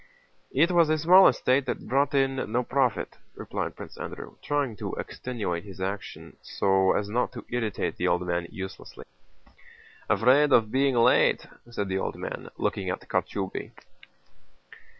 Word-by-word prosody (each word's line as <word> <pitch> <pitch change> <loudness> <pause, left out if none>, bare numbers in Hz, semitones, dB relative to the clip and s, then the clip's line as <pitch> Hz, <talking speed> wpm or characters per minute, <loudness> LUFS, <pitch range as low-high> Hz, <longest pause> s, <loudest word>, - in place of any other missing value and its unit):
"It 170 - +3
was 170 -3 +4
a 155 - +3
small 180 +5 +7
estate 130 +1 +2
that - - -4
brought 140 +2 +1
in 135 -4 0
no 125 +2 +1
profit," 130 -1 -1 0.2
replied - - -4
Prince - - -10
Andrew, - - -7
trying 145 -6 -1
to - - -5
extenuate 100 -9 -4
his 95 -2 -11
action 95 +1 -6
so 95 -1 +2
as 105 - -1
not 120 +4 -1
to 120 - -9
irritate 115 -4 -2
the - - 0
old 90 +1 +1
man 85 -1 -1
uselessly. 95 0 -9 1.0
"Afraid 140 +5 +4
of 110 -2 +4
being 135 0 +2
late..." 115 0 +4 0.2
said 105 -4 -3
the 95 0 -1
old - - -3
man, - - -6
looking 95 -2 -2
at 90 - -3
Kochubéy. 95 -2 -3
120 Hz, 150 wpm, -27 LUFS, 95-135 Hz, 1.0 s, small